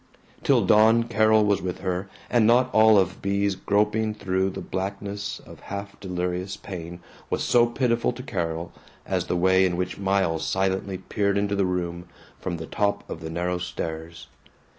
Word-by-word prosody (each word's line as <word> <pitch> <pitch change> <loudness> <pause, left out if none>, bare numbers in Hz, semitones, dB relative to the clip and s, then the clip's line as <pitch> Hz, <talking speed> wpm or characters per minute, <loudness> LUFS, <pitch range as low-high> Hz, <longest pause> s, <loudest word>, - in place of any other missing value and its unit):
Till - - +3
dawn 110 +2 +5
Carol 110 -1 +3
was 100 -1 +2
with 90 0 -4
her, 95 +1 -2 0.2
and 115 -3 +3
not 125 +2 +4
all 110 -1 +6
of 95 -1 +1
Bea's 100 0 +1
groping 105 +3 0
through 95 -2 0
the 95 - -6
blackness 100 +2 -4
of - - -14
half 100 0 -7
delirious 90 0 -3
pain 85 -2 -8 0.3
was - - -1
so 120 -1 +4
pitiful 120 -1 +1
to 125 +1 -8
Carol 85 -7 -3 0.3
as - - -1
the 90 - 0
way 95 +1 +4
in 90 -2 +1
which 90 +1 -3
Miles 95 -5 +1
silently 95 0 -1
peered 100 +2 -1
into 100 0 0
the 100 -1 +2
room 85 -1 -3 0.3
from 85 -2 -3
the 80 - -6
top 100 +3 -1
of 80 - -7
the 80 - -5
narrow 90 +2 -2
stairs. 80 -2 -5
95 Hz, 170 wpm, -25 LUFS, 90-105 Hz, 0.3 s, all